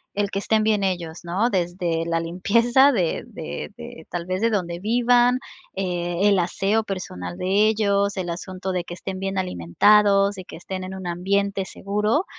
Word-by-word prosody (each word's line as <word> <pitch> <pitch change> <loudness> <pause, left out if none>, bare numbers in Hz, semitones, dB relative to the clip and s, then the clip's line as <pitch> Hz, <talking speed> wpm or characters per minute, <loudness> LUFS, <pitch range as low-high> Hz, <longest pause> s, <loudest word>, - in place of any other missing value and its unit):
el 205 -1 0
que 195 - -1
estén 215 +1 +1
bien 215 -2 +2
ellos, 175 -3 -2
no 190 +8 0
desde 175 -2 -1
la 165 0 +1
limpieza 230 +11 +3
de 185 - 0
de 75 0 -7
de, 160 - -10
tal 175 -1 -4
vez, 185 +2 -2
de 230 - +3
donde 175 -5 -2
vivan, 245 +3 +3 0.4
eh, 175 0 0
el 200 - +4
aseo 195 +5 0
personal 90 - -6
de 200 +4 +3
ellos, 200 -2 +1
el 180 -2 -3
asunto 185 +2 -5
de 180 -1 -1
que 175 0 -8
estén 190 0 -6
bien 195 0 -3
alimentados 195 - +3
y 185 - -8
que - - -10
estén 185 +2 -6
en 185 +1 -6
un 190 - -8
ambiente 195 +3 0
seguro. 210 - -1
190 Hz, 180 wpm, -23 LUFS, 175-205 Hz, 0.4 s, el